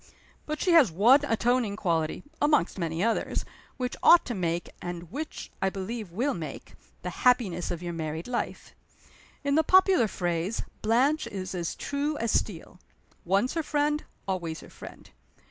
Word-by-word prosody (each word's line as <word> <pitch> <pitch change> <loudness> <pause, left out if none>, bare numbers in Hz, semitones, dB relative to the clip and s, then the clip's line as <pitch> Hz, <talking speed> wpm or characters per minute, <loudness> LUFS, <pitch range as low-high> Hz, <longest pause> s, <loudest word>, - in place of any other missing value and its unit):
"But 305 0 -3
she 365 - +2
has 310 - +6
one 225 - +6
atoning 240 -4 +1
quality 165 -6 -1 0.2
(among 295 0 +4
many 170 -1 -2
others) 230 0 0 0.3
which 250 -2 -2
ought 345 - +7
to 240 - -3
make 175 -3 -2
and 175 -1 -6
which 305 +5 -6
I 190 - +2
believe 200 +2 -5
will 250 +10 0
make 155 -5 -7 0.3
the 180 - -3
happiness 220 -9 +2
of 175 0 -4
your 175 -1 -4
married 160 0 -4
life. 245 -1 -4 0.7
In 280 0 +1
the 315 +2 +4
popular 375 - +5
phrase, 175 +2 -2 0.2
Blanche 260 +8 +2
is 190 -1 -5
as 175 -3 -3
true 290 +2 -2
as 230 -1 -1
steel. 180 -2 -2 0.5
Once 195 +8 +2
her 330 - 0
friend, 295 0 0 0.2
always 170 -4 -3
her - - -14
friend. - - -11
215 Hz, 160 wpm, -28 LUFS, 175-280 Hz, 0.7 s, ought